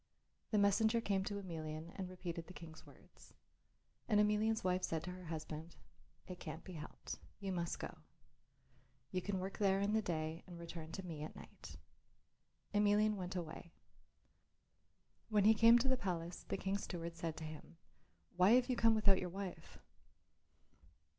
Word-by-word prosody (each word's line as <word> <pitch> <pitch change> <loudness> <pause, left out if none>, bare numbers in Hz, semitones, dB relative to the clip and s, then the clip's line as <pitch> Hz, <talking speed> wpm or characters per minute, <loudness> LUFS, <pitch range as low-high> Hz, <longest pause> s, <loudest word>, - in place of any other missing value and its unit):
The 215 - +2
messenger 220 +3 +4
came 200 -4 +1
to 205 - -2
Emelian 160 -3 -5
and 190 -2 -4
repeated 170 -2 -5
the 180 - -11
King's 160 -2 -10
words. - - -18 0.7
And 210 -3 +4
Emelian's 210 +1 +3
wife 185 0 +2
said 165 -3 -1
to 180 - -4
her 180 0 -9
husband, 160 0 -5 0.5
"It 180 -1 -8
can't 160 0 -6
be 185 - -9
helped; 155 -2 -7 0.2
you 195 -2 -3
must 170 -2 -1
go. - - -6 1.1
You 185 - 0
can 200 +1 -1
work 190 +1 -4
there 195 -2 +4
in 200 +1 +1
the 220 - +4
day 160 -3 -2
and 175 -2 -9
return 165 -1 -7
to 190 - -5
me 160 -4 -5
at 155 - -6
night." - - -11 1.0
Emelian 210 +1 +4
went 185 -2 -4
away. 170 -1 -5 1.6
When 210 -2 +4
he 215 +2 +8
came 230 +2 +8
to 245 +3 +1
the 260 0 +3
palace 175 -4 -3
the - - -1
King's 195 +1 -1
steward 170 -2 -5
said 165 -1 -3
to - - -6
him, 155 +1 -8 0.6
"Why 180 +5 +6
have 250 +1 +5
you - - +2
come 225 -1 +5
without 200 -3 +5
your 180 - -2
wife?" 190 0 -6
185 Hz, 165 wpm, -38 LUFS, 165-205 Hz, 1.6 s, he